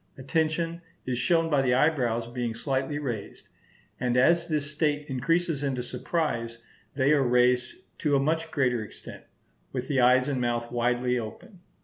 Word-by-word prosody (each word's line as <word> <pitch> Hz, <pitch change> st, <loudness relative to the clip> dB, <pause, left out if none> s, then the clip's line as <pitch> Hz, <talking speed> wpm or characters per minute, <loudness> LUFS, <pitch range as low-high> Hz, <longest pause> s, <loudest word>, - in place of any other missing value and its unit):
Attention 160 Hz, +4 st, -1 dB, 0.2 s
is 125 Hz, -1 st, -2 dB
shown 165 Hz, +5 st, +2 dB
by 145 Hz, -4 st, +2 dB
the 125 Hz, -2 st, +2 dB
eyebrows 125 Hz, -6 st, +1 dB
being 120 Hz, -1 st, -4 dB
slightly 135 Hz, +3 st, -2 dB
raised; 120 Hz, -8 st, -5 dB, 0.5 s
and 125 Hz, 0 st, 0 dB
as 170 Hz, +6 st, +4 dB
this 150 Hz, -3 st, -1 dB
state 150 Hz, -1 st, 0 dB
increases 165 Hz, +4 st, 0 dB
into 135 Hz, -3 st, -1 dB
surprise, 120 Hz, -5 st, -2 dB, 0.4 s
they 135 Hz, +1 st, +3 dB
are 150 Hz, -2 st, +4 dB
raised 125 Hz, 0 st, +2 dB, 0.2 s
to 150 Hz, -4 st, +2 dB
a -, -, +4 dB
much 160 Hz, +3 st, 0 dB
greater 125 Hz, -7 st, +1 dB
extent, 105 Hz, -, -11 dB, 0.5 s
with 130 Hz, -1 st, -4 dB
the 135 Hz, -4 st, +2 dB
eyes 125 Hz, +1 st, +5 dB
and 135 Hz, -3 st, -1 dB
mouth 120 Hz, -1 st, -1 dB
widely 125 Hz, +1 st, +1 dB
open. 145 Hz, -, -9 dB
130 Hz, 155 wpm, -27 LUFS, 125-150 Hz, 0.5 s, eyes